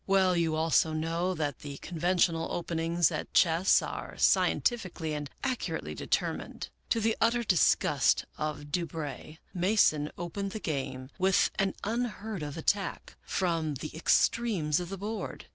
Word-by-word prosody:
Well, 190 -2 +4
you 165 -2 +1
also 160 0 +2
know 165 +4 -1
that 145 -5 -2
the 140 -1 -7
conventional 170 0 0
openings 170 0 +1
at 155 - -4
chess 170 +2 +4
are - - -6
scientifically 185 -9 +1
and 145 -1 -4
accu 260 -3 -1
rately - - -7
determined. - - -2 0.2
To 230 - +2
the 225 0 +1
utter 235 +1 +3
disgust 185 -7 +3
of 145 -1 -4
Du 175 0 0
Brey, 155 -1 -7 0.2
Mason 175 -6 +3
opened 195 +3 -4
the 220 - -4
game 135 -5 -4
with 190 0 +3
an 195 -1 +1
unheard 220 -3 -3
of 145 +1 -5
attack 195 +4 -1
from 165 -5 -1
the 155 +4 -6
ex 160 - +4
tremes 185 -11 -1
of 175 -1 -5
the 195 - -5
board. 210 +3 -5
170 Hz, 150 wpm, -30 LUFS, 155-195 Hz, 0.2 s, Well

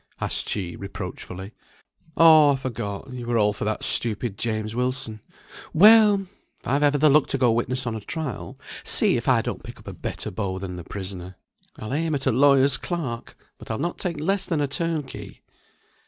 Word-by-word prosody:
asked - - -1
she, 90 -4 -3
reproachfully. 95 0 -7 0.7
"Oh 155 -3 +7
I - - 0
forgot. 125 -2 -5
You 120 -2 -6
were 120 -1 +1
all 105 -1 +3
for - - -5
that 110 0 -2
stupid 115 -2 -1
James 110 -1 -3
Wilson. 125 -3 -2 0.5
Well! 210 +1 +7 0.3
if - - -13
I've 140 +3 +1
ever 145 0 +3
the 155 +2 +4
luck 150 0 +5
to 135 - 0
go 125 -3 +3
witness 125 +3 -1
on 120 - -2
a 110 - -4
trial, 155 +5 -5 0.3
see - - +3
if - - -3
I - - +4
don't - - -4
pick - - -10
up - - -17
a - - -6
better - - -5
beau 95 -1 -3
than 95 -1 -6
the 90 - -7
prisoner. 95 -1 -7 0.4
I'll 110 +4 -6
aim 160 +1 0
at 135 - -4
a 130 - +3
lawyer's 135 +1 +4
clerk, 140 -10 -5 0.2
but - - -12
I'll 110 - -2
not 170 +4 -3
take 170 -5 -3
less 195 +5 0
than 165 -4 0
a 145 - +1
turnkey." 155 -1 -4
130 Hz, 195 wpm, -24 LUFS, 110-150 Hz, 0.7 s, Oh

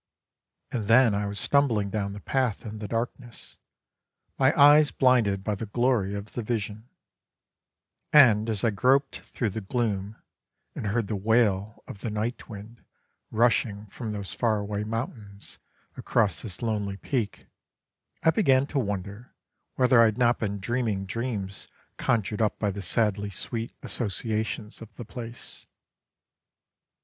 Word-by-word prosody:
And 110 -5 -3
then 115 0 +6
I 100 0 -1
was 100 0 -4
stumbling 120 -6 +2
down 100 -1 -2
the 105 - -7
path 130 -3 -1
in 110 -1 -6
the 105 - -5
darkness, 120 +1 -5 0.8
my 135 0 +5
eyes 145 +1 +8
blinded 115 -7 +3
by 105 - -1
the 105 +2 -5
glory 115 -3 +1
of 100 +1 -7
the 120 - -3
vision; 110 0 -4 1.2
and 115 -7 +6
as 105 -3 -1
I 115 - +3
groped 135 +6 +2
through 115 -5 -3
the 110 - -4
gloom, 105 -2 -2 0.6
and 110 - -4
heard 110 +2 0
the 105 - -3
wail 105 0 +1
of 100 - -9
the 115 - -3
night 110 +3 -3
wind 110 +2 -10 0.5
rushing 110 -2 +1
from 115 -4 -5
those 100 -2 -5
far 115 -3 +1
away 105 0 -3
mountains, 110 -2 -5 0.4
across 95 -8 +1
this 100 0 -6
lonely 105 -3 -1
peak, 115 -2 -3 0.8
I 160 - +6
began 140 -10 +3
to 140 - +2
wonder 105 0 -5 0.4
whether 125 -2 +5
I - - +7
had 110 0 +1
not 120 -1 +3
been 100 -2 -2
dreaming 110 -2 -1
dreams 100 -3 -4 0.3
conjured 105 -1 0
up 110 - +1
by 105 -2 0
the 100 +1 -6
sadly 105 +2 0
sweet 115 +4 -4
associations 110 -1 -2
of 110 -1 -12
the 120 - -8
place. 115 +3 -7
110 Hz, 145 wpm, -27 LUFS, 100-120 Hz, 1.2 s, eyes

